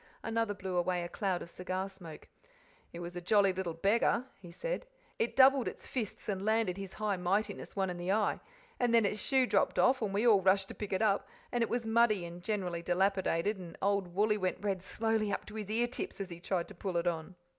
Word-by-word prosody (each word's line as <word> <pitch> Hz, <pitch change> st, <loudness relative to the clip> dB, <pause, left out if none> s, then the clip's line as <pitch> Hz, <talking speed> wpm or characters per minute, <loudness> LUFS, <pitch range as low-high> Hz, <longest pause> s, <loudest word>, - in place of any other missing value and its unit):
Another 225 Hz, -2 st, 0 dB
blew 190 Hz, -2 st, -3 dB
away 175 Hz, 0 st, +1 dB
a -, -, -3 dB
cloud 185 Hz, 0 st, -1 dB
of -, -, -11 dB
cigar 185 Hz, +1 st, -3 dB
smoke. 180 Hz, -5 st, -11 dB, 0.6 s
"It 170 Hz, -, -7 dB
was 175 Hz, +1 st, -6 dB
a 175 Hz, -, -4 dB
jolly 195 Hz, +1 st, +4 dB
little 180 Hz, -3 st, -3 dB
beggar," 215 Hz, +7 st, +2 dB
he 180 Hz, -3 st, -11 dB
said. -, -, -4 dB, 0.3 s
"It 230 Hz, -, 0 dB
doubled 270 Hz, -1 st, +6 dB
its -, -, -6 dB
fists 230 Hz, -6 st, -4 dB
and 195 Hz, -2 st, -2 dB
landed 220 Hz, -3 st, +2 dB
His 195 Hz, -1 st, -6 dB
High 210 Hz, -2 st, -1 dB
Mightiness 200 Hz, +4 st, -1 dB
one 190 Hz, -2 st, 0 dB
in 175 Hz, -, -6 dB
the 175 Hz, +2 st, -2 dB
eye; 210 Hz, +1 st, +1 dB, 0.4 s
and 240 Hz, -1 st, +3 dB
then 230 Hz, -2 st, +5 dB
its 210 Hz, +1 st, -1 dB
shoe 265 Hz, -2 st, +3 dB
dropped -, -, +1 dB
off, 255 Hz, 0 st, +4 dB
and 210 Hz, -3 st, -1 dB
we 205 Hz, +4 st, +1 dB
all 210 Hz, -5 st, +6 dB
rushed 195 Hz, +1 st, +3 dB
to -, -, -6 dB
pick 210 Hz, -, -6 dB
it 190 Hz, +3 st, +1 dB
up, 200 Hz, -2 st, +2 dB, 0.2 s
and 240 Hz, -, 0 dB
it 230 Hz, -, +1 dB
was 240 Hz, -1 st, -1 dB
muddy 225 Hz, -4 st, +3 dB
and 170 Hz, +1 st, -8 dB
generally 180 Hz, -4 st, -2 dB
dilapidated, 190 Hz, +1 st, +1 dB
and 170 Hz, -3 st, -9 dB
old 195 Hz, -3 st, 0 dB
Wooly 210 Hz, +2 st, +3 dB
went 185 Hz, -1 st, 0 dB
red 195 Hz, -2 st, -1 dB
slowly 220 Hz, +1 st, 0 dB
up -, -, -2 dB
to 210 Hz, -, -11 dB
his 215 Hz, -2 st, -5 dB
ear 230 Hz, +3 st, +2 dB
tips 240 Hz, -3 st, -5 dB
as 195 Hz, -2 st, -5 dB
he 170 Hz, -, -7 dB
tried 175 Hz, -1 st, -1 dB
to -, -, -9 dB
put 190 Hz, -1 st, -4 dB
it 170 Hz, 0 st, +1 dB
on." 170 Hz, +1 st, -2 dB
195 Hz, 230 wpm, -32 LUFS, 180-220 Hz, 0.6 s, doubled